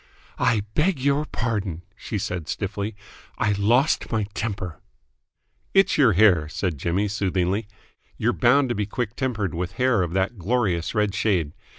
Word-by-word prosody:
"I 110 -3 +2
beg 165 -1 +1
your 140 +3 +1
pardon," 105 - -3
she - - -5
said 90 -4 -3
stiffly. 100 +1 -3 0.4
"I 105 - +1
lost 115 +9 +2
my 110 -2 +1
temper." 100 -6 -4 0.9
"It's 195 -1 +5
your 125 -8 +5
hair," 90 -6 +4
said 85 -3 -2
Jimmy 90 +7 0
soothingly. 100 0 -1 0.5
"You're 120 +2 +1
bound 130 +2 +3
to - - +1
be 105 -1 -1
quick 115 +1 -3
tempered 115 -8 -2
with 90 +2 -3
hair 125 -4 +2
of 85 -2 -2
that 95 +3 -1
glorious 95 -3 0
red 105 -2 +1
shade. 90 -8 0
105 Hz, 155 wpm, -24 LUFS, 90-120 Hz, 0.9 s, It's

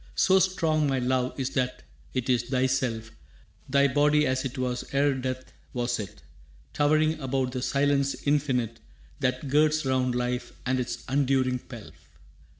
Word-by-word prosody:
«So 190 0 +4
strong 160 -5 +1
my 135 -1 +1
love 125 +1 0
is 135 0 -1
that 125 -1 -2 0.3
it 130 -2 -1
is 125 -3 +2
thyself, 125 -4 0 0.6
Thy 140 +1 +4
body 150 +2 +3
as 130 -1 0
it 135 0 -5
was 125 -1 -2
ere 140 +1 +3
death 130 0 -5 0.2
was 120 -1 -1
it, 100 - -8 0.5
Towering 155 +2 +2
above 130 -2 -1
the 125 0 -4
silence 140 +1 +1
infinite 130 -6 0 0.4
That 130 0 -1
girds 150 +2 +3
round 130 -1 +1
life 125 0 -2
and 130 +1 +1
its 120 -1 -4
unduring 130 -2 +1
pelf. 120 -3 -13
130 Hz, 150 wpm, -27 LUFS, 125-145 Hz, 0.6 s, So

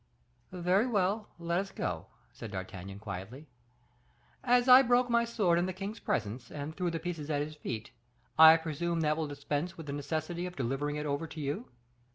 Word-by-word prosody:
"Very 185 +5 +2
well, 205 -1 0
let 170 +1 0
us 195 0 -3
go," 80 -3 -3 0.2
said 115 - -8
D'Artagnan, 95 0 -7
quietly. 100 +7 -7 1.0
"As 245 0 +4
I 255 +1 +10
broke 245 -1 +3
my 235 0 +4
sword 195 -7 +2
in 175 - 0
the 185 - -3
king's 205 +3 -5
presence, 115 +3 -2
and 150 +2 -6
threw 180 +1 -1
the 165 - -2
pieces 165 -3 -5
at 145 -2 +1
his 155 +1 -7
feet, 115 -8 -6 0.4
I 160 +1 +10
presume 165 +1 -2
that 155 -1 +2
will 160 -1 -2
dispense 145 +4 -3
with 165 - -8
the 140 - -4
necessity 160 +4 -3
of 180 - -9
delivering 135 +3 -2
it 150 0 -3
over 145 +3 -2
to 160 - -9
you." 150 - -3
160 Hz, 190 wpm, -31 LUFS, 145-185 Hz, 1.0 s, I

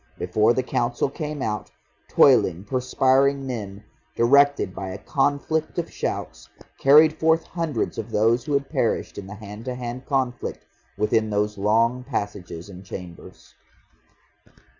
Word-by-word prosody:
Before 105 +5 +2
the 130 +2 0
Council 120 +1 -1
came 150 -1 -4
out, 105 -1 -3 0.4
toiling 100 - +4
perspiring 135 +4 +2
men, 105 -6 -6 0.3
directed 140 -3 +4
by 95 0 -5
a 95 - -6
conflict 145 - -1
of 170 - -3
shouts, - - -5 0.3
carried 155 +3 +6
forth 160 0 +3
hundreds 160 -11 -3
of 110 +1 -5
those 115 +3 +2
who 150 - -2
had 140 0 +1
perished 115 - -1
in 95 - -9
the 105 - -8
hand 105 +1 -10
to 125 -1 -3
hand 125 +1 -6
conflict 130 -4 -2 0.3
within 110 +1 +1
those 105 0 0
long 115 +5 +1
passages 100 -9 -5
and 95 -1 -11
chambers.... 90 -2 -10
120 Hz, 140 wpm, -24 LUFS, 105-140 Hz, 0.4 s, carried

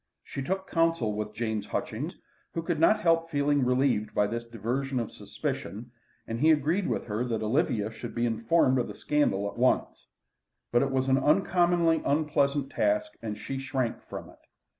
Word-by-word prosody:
She 135 - -6
took 190 +7 -2
counsel 165 -10 +1
with 105 0 -4
James 110 -3 -2
Hutchings, - - -3 0.4
who 165 - -1
could 165 -2 -1
not 215 +6 +4
help 165 -2 +2
feeling 145 -2 +2
relieved 125 -4 +1
by 105 - +4
this 115 +3 -3
diversion 120 +4 -2
of 115 - -3
suspicion, 115 +4 -5 0.3
and 115 +1 -4
he 155 - +4
agreed 160 +5 +2
with - - -1
her 110 +1 -2
that 115 -3 -2
Olivia 110 -3 +1
should 110 - -8
be 120 0 +1
informed 125 +4 +2
of 120 - -1
the - - -8
scandal 100 -10 +1
at 100 - -7
once. 130 +1 +1 0.6
But 120 - +4
it 140 - +1
was 130 0 0
an 135 0 +4
uncommonly 175 +1 +3
unpleasant 140 -2 +1
task, 105 0 +1
and 105 -2 -4
she 135 +5 -5
shrank 135 -3 -2
from - - -8
it. - - -21
130 Hz, 180 wpm, -28 LUFS, 115-155 Hz, 0.6 s, not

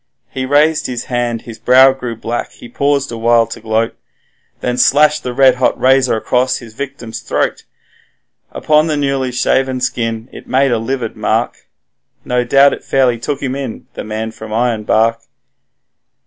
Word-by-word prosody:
He 130 0 -4
raised 150 +3 +2
his 125 -2 -4
hand, 120 -2 -1
his 115 -2 -10
brow 130 +2 +6
grew 125 -3 -6
black, 115 +1 -4
he - - -12
paused 140 +2 0
awhile 115 0 +2
to 115 - -8
gloat, 110 +1 -1 0.6
Then 125 0 -2
slashed 150 +4 +4
the 125 - -4
red 130 0 +4
hot 130 - +1
razor 130 -1 +3
back - - -19
across 130 +1 +1
his 115 -3 -12
victim's 125 -3 -7
throat; 120 - -2 0.9
Upon 155 +1 +2
the 155 -2 -1
newly 135 -2 -1
shaven 130 +1 0
skin 115 -2 -2
it - - -12
made 135 0 +2
a 115 - +1
livid 120 0 -3
mark - - -2 0.6
No 125 0 0
doubt 135 +3 +4
it - - -7
fairly 125 -3 +1
took 140 +4 -4
him 130 -1 -2
in 135 -5 -6
the - - -6
man 110 +1 -4
from 110 -1 -10
Ironbark. 115 0 +1
125 Hz, 165 wpm, -15 LUFS, 115-135 Hz, 0.9 s, brow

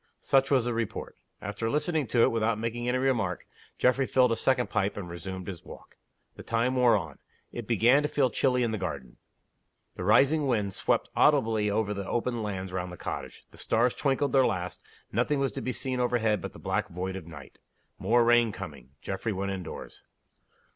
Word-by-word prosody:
Such 135 0 +3
was 130 -4 +3
the 120 - -1
report. 115 -2 -4 0.3
After 105 +3 -3
listening 150 +1 0
to 115 +1 +3
it, - - +4
without 115 -1 +1
making 115 +2 -2
any 125 - +1
remark, 120 -9 0 0.3
Geoffrey 130 +1 +2
filled 125 -2 +3
a - - +2
second 130 +1 +1
pipe, 100 +1 0
and 95 -3 -5
resumed 95 +2 -6
his 90 -3 -7
walk. - - -13 0.4
The - - -8
time 115 +3 0
wore 125 -2 +5
on. 80 -4 -7 0.3
It 120 -3 -6
began 120 +5 +4
to 150 - -1
feel 130 -4 +2
chilly 125 +1 +2
in 115 - 0
the 110 - -2
garden. 70 -9 -5 0.8
The - - -5
rising 140 - +4
wind 105 -6 0
swept - - 0
audibly 115 -8 +3
over 105 0 0
the 100 -1 -5
open 120 0 -1
lands 95 -3 -4
round 90 -1 -3
the 90 - -9
cottage; - - -6
the - - -15
stars 120 +2 +2
twinkled 140 -1 0
their 135 -1 +6
last; 90 -2 -3 0.3
nothing 125 +7 +1
was 135 -1 0
to - - -5
be 130 - -2
seen 130 0 -2
overhead 115 -5 +1
but - - -6
the - - -12
black - - -1
void 95 +2 -4
of 90 -4 -8
night. 75 -5 -12 0.4
More 120 +1 +3
rain 120 -1 +4
coming. 70 -7 -9
Geoffrey 100 +3 -3
went 100 +1 -2
indoors. 95 -4 -7
115 Hz, 195 wpm, -28 LUFS, 95-125 Hz, 0.8 s, their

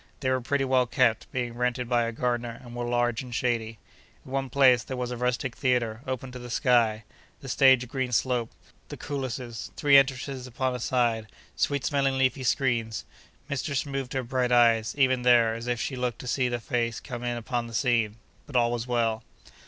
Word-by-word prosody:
They 130 -2 +1
were 130 0 +1
pretty 135 +3 0
well 130 -1 +2
kept, 120 -2 +1
being 120 -2 -2
rented 125 +1 -1
by 120 -1 +2
a 115 - -2
gardener, 120 0 -2
and 120 -1 -11
were 120 0 -3
large 120 -1 +1
and 125 -2 -7
shady. 115 -3 -1 0.5
In 130 - -11
one 135 -1 -1
place 130 -2 +5
there 130 +3 -6
was 125 0 -3
a - - -3
rustic 125 +1 -1
theatre, 120 -4 0
open 130 0 -4
to 125 - -8
the 120 0 -9
sky; 115 -4 +2 0.4
the 135 - -9
stage 130 -1 +5
a - - -6
green 130 +1 -3
slope; 120 -1 +1 0.4
the - - -7
coulisses, 130 -5 -5
three 140 -1 +6
entrances 135 -1 +1
upon 130 +1 -2
a 125 - -4
side, 120 -3 0 0.3
sweet 140 -2 0
smelling 135 -2 +1
leafy 130 0 +1
screens. 120 -4 0 0.4
Mistress 140 -1 -2
moved 135 -2 -4
her 130 -1 -1
bright 125 0 -1
eyes, 115 -2 +4
even 130 -2 +3
there, 120 -2 +5
as 115 +1 -6
if 120 -1 -1
she 130 - -3
looked 125 -2 -2
to 125 - -8
see 125 0 +1
the 120 0 -2
face 115 -1 -2
come 120 -2 -7
in 120 -1 -2
upon 120 0 -3
the 115 - -10
scene; 115 -5 +1 0.3
but 145 - -11
all 120 -1 +3
was 120 0 -3
well. 115 -2 0
125 Hz, 205 wpm, -27 LUFS, 120-130 Hz, 0.5 s, three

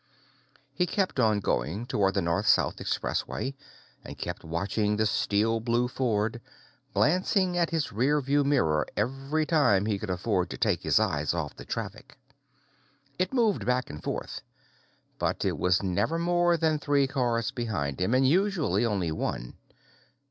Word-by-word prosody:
He 180 +5 0
kept 190 -8 -1
on 110 -4 +3
going 85 - -1
toward 100 -5 +1
the 95 - +1
North 85 0 0
South - - +3
Expressway, 135 - -2 0.5
and - - -9
kept - - -5
watching 100 +6 -1
the 110 - +2
steel 105 +2 +1
blue 120 +2 +1
Ford, 115 -3 -1 0.5
glancing 185 +2 +2
at 170 -1 +1
his 160 -7 -1
rear 130 +8 +2
view 140 +1 +1
mirror 80 - +2
every 135 +4 -1
time 140 - +3
he 105 -2 -1
could 105 - -6
afford 90 -1 0
to - - -6
take - - +1
his - - +3
eyes 75 +3 0
off 75 -4 -3
the - - -11
traffic. - - -6 1.0
It 185 - 0
moved 230 -6 +2
back 125 +1 0
and 75 - -8
forth, - - -4 0.8
but - - -1
it - - -1
was 90 +1 +2
never 95 - 0
more 175 0 +2
than 160 -2 +1
three 145 -1 +2
cars 120 -4 0
behind 90 - -3
him, 110 +7 +2
and 130 0 +4
usually 185 -2 +2
only 100 -8 0
one. - - -3
120 Hz, 155 wpm, -28 LUFS, 100-150 Hz, 1.0 s, and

